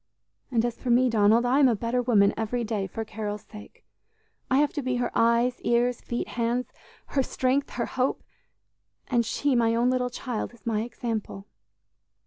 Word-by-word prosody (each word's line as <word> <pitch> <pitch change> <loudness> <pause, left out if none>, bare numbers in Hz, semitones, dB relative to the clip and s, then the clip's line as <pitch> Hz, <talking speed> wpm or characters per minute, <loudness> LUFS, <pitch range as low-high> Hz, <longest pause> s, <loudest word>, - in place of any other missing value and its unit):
And 235 -3 +1
as 240 -1 -3
for 255 - -3
me, 245 +1 +4
Donald, 220 +2 +4
I 255 +3 +3
am 280 - +6
a 240 - +3
better 235 +3 -1
woman 210 -5 +4
every 230 +2 -2
day 210 -3 -2
for 225 +4 -5
Carol's 210 -1 -5
sake; 210 -1 -14 0.6
I 260 - +3
have 290 0 +2
to 290 - -2
be 255 -1 -1
her 245 -1 -1
eyes, 235 +2 +2
ears, 240 +1 +1
feet, 240 - -4
hands 240 +1 -1 0.4
her 275 - +1
strength, 260 +2 0
her 235 - -1
hope; 255 +1 -1 0.9
and 240 -2 +2
she, 280 +5 0
my 230 -1 +3
own 240 +2 +2
little 250 -1 0
child, 245 -1 -5
is 230 - -25
my 220 -2 0
example!" 225 -4 -4
240 Hz, 180 wpm, -26 LUFS, 225-250 Hz, 0.9 s, am